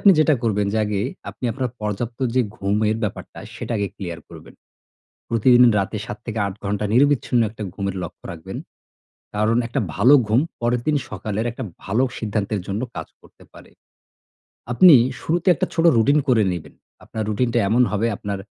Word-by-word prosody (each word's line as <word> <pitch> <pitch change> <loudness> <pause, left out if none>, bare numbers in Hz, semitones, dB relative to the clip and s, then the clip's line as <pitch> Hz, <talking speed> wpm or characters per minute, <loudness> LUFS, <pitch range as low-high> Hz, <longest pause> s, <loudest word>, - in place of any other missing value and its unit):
আপনি 200 - +7
যেটা 155 -1 +5
করবেন 105 -3 +1
যে, 110 - +1
আগে 105 -2 -1 0.3
আপনি - - -11
আপনার 130 -1 -3
পর্যাপ্ত 105 +3 -3 0.2
যে 130 - +4 0.2
ঘুমের 105 +2 0
ব্যাপারটা, 105 - -5 0.2
সেটা - - -5
আগে 100 -1 -1
ক্লিয়ার 85 -4 -6
করবেন। - - -13 0.8
প্রতিদিন 120 +2 +5 0.2
রাতে 100 +3 -2
৭-৮ 105 -2 -4
ঘণ্টা 105 +1 -1
নিরবিচ্ছিন্ন 130 -2 +3
একটা 110 0 -8
ঘুমের 100 -1 -3
লক্ষ্য 85 - -10
রাখবেন। 80 -2 -8 0.8
কারণ 110 +2 +2
একটা 125 +4 -2 0.2
ভালো 120 +8 +5
ঘুম 110 +5 +3 0.2
পরের 120 0 +1
দিন 155 - +3
সকালের 105 +2 -3
একটা 125 +3 -6 0.2
ভালো 110 +7 +1
সিদ্ধান্তের 105 -2 -2
জন্য 100 +4 -2
কাজ 80 -1 -5
করতে - - -20
পারে। - - -15 1.0
আপনি 170 +6 +8 0.3
শুরুতে 170 +3 0
একটা - - -1
ছোট 165 - +1
রুটিন 140 +7 +4
করে 120 -4 +4
নেবেন। 85 -3 -7 0.3
আপনার 110 - -5
রুটিনটা 120 +3 +1
এমন 120 +4 +4
হবে 105 +2 +1
আপনার 100 0 -4
110 Hz, 160 wpm, -22 LUFS, 100-125 Hz, 1.0 s, আপনি